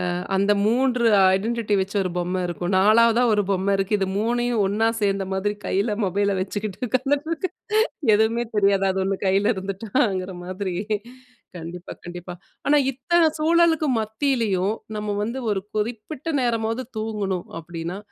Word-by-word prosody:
அ - - -2 0.2
அந்த 200 +2 +3
3 245 +1 +2 0.3
ஐடென்டிட்டி 220 0 -1
வச்சு 195 +2 -5
ஒரு 180 - -3
பொம்ம 180 +1 -1
இருக்கும் 175 +2 -3
4வதா 230 +4 +5
ஒரு 205 -1 +2
பொம்ம 195 +1 +1
இருக்கு. 195 +2 +1
இது 195 - 0
3யும் 240 0 +1
ஒன்னா 215 +3 +1
சேர்ந்த 195 -1 +1
மாதிரி 205 +2 0
கையில 205 +2 0
மொபைல 200 +1 +1
வச்சுக்கிட்டு 205 +3 -4
உக்காந்துட்டு 280 +4 0
இருக்கு. 330 +2 -2 0.6
எதுவுமே 225 +3 +2
தெரியாது 195 -1 +3
அது 190 - -2
ஒன்னு 195 0 0
கையில 200 +4 +3
இருந்துட்டாங்கிற 195 0 -1
மாதிரி. 185 -1 -4 0.8
கண்டிப்பா, 170 +2 -8
கண்டிப்பா. 175 +1 -7 0.3
ஆனா 295 +1 +5
இத்தன 330 +7 +2 0.2
சூழலுக்கு 325 -1 +3
மத்தியிலயும் 220 -4 0 0.2
நம்ம 210 0 -3
வந்து 235 +5 -3
ஒரு 200 -2 +1 0.2
குறிப்பிட்ட 230 +8 -3
நேரமாவது 230 +1 0
தூங்கணும் 205 -4 -2
அப்பிடின்னா, 170 +2 -6
210 Hz, 140 wpm, -23 LUFS, 190-235 Hz, 0.8 s, 4வதா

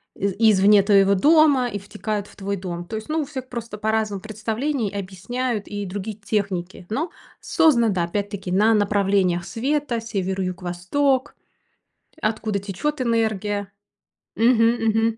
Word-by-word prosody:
из 200 0 -1
извне 210 -2 +5
твоего 200 -1 +4
дома 290 - +5
и 205 -4 -4
втекают 210 +1 -4
в - - -18
твой 200 0 -3
дом. 175 -2 -5
То 220 - -6
есть, 220 - -8
ну, 315 0 0
у - - -3
всех 260 -3 -7
просто 230 -3 -6
по-разному 215 -2 -1
представлений, 220 +3 -2
объясняют 205 +4 -3
и 205 -1 -4
другие 200 +3 -5
техники. 195 -4 -3
Но 300 +10 -1 0.3
создана, 240 -8 +3
да, 185 -4 0
опять-таки, 200 +1 -3
на 210 +5 +4
направлениях 200 -4 +2
света: 260 +2 -1
север, 195 -4 -2
юг, 185 0 -3
восток, 255 +11 0 0.9
откуда 215 -3 -1
течет 205 +10 -3
энергия. 215 -4 0 0.7
Мгм, 230 0 +4
мгм. 225 +1 +2
210 Hz, 140 wpm, -23 LUFS, 195-235 Hz, 0.9 s, извне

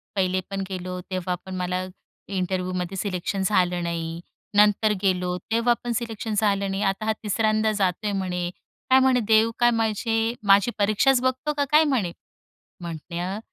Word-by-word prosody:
पहिले 185 -1 +1
पण 195 0 -3
गेलो 180 -1 -5
तेव्हा 185 -1 -1
पण 190 -1 -6
मला 180 0 -2 0.4
इंटरव्ह्युमध्ये 185 -1 -2
सिलेक्शन 190 0 -2
झालं 180 -3 +2
नाही. 165 -1 -3 0.4
नंतर 210 +1 +4
गेलो 180 -2 0
तेव्हा 230 +2 +3
पण 240 - -2
सिलेक्शन 225 -1 -3
झालं 200 -2 +1
नाही. 195 +1 -2
आता 195 +2 -1
हा 220 - +2
तिसऱ्यांदा 215 +1 +1
जातोय 205 0 0
म्हणे, 180 -3 -2 0.4
काय 260 0 +7
म्हणे 260 -1 +4
देव 220 +1 +4
काय 240 0 +5 0.7
माझी 200 +3 +5
परीक्षाच 230 +6 +3
बघतो 260 +3 0
का 285 -1 0
काय? 305 +1 +7
म्हणे 250 - 0 0.7
म्हटल 175 +3 -5
195 Hz, 145 wpm, -24 LUFS, 180-220 Hz, 0.7 s, काय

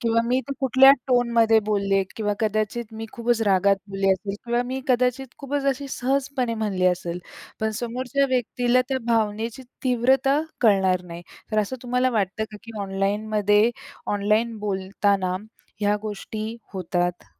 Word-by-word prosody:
किंवा 230 0 +2
मी 250 +2 +1
ते - - -1
कुठल्या 265 +1 +7 0.2
टोनमध्ये 235 -2 +4
बोलले 200 -2 +2
किंवा 210 -2 0
कदाचित 215 +2 0
मी 225 0 -6
खूपच 235 -1 0
रागात 195 -1 +3
बोलले 195 0 0
असेल 195 +1 -4
किंवा 240 +1 +1
मी 260 +2 -4
कदाचित 250 +1 +2
खूपच 280 0 -3
अशी 275 +1 0
सहजपणे 265 -2 -1
म्हणली 200 -4 0
असेल, 175 -1 0 0.4
पण 220 0 +1
समोरच्या 255 +3 -1
व्यक्तीला 245 0 +2
त्या 265 -1 0
भावनेची 225 +2 0 0.2
तीव्रता 265 +3 +3 0.2
कळणार 190 -5 +3
नाही. 170 0 -9 0.3
तर 215 - +2
असं 215 +5 -1
तुम्हाला 250 +1 +1
वाटतं 210 -1 -1
का 210 - -9
की 230 -2 -9
ऑनलाइनमध्ये 205 +2 +1 0.4
ऑनलाइन 215 +3 +1
बोलताना 195 -1 0 0.4
ह्या 205 0 +2
गोष्टी 215 +2 -5 0.2
होतात? 175 -1 -2
220 Hz, 140 wpm, -24 LUFS, 200-250 Hz, 0.4 s, कुठल्या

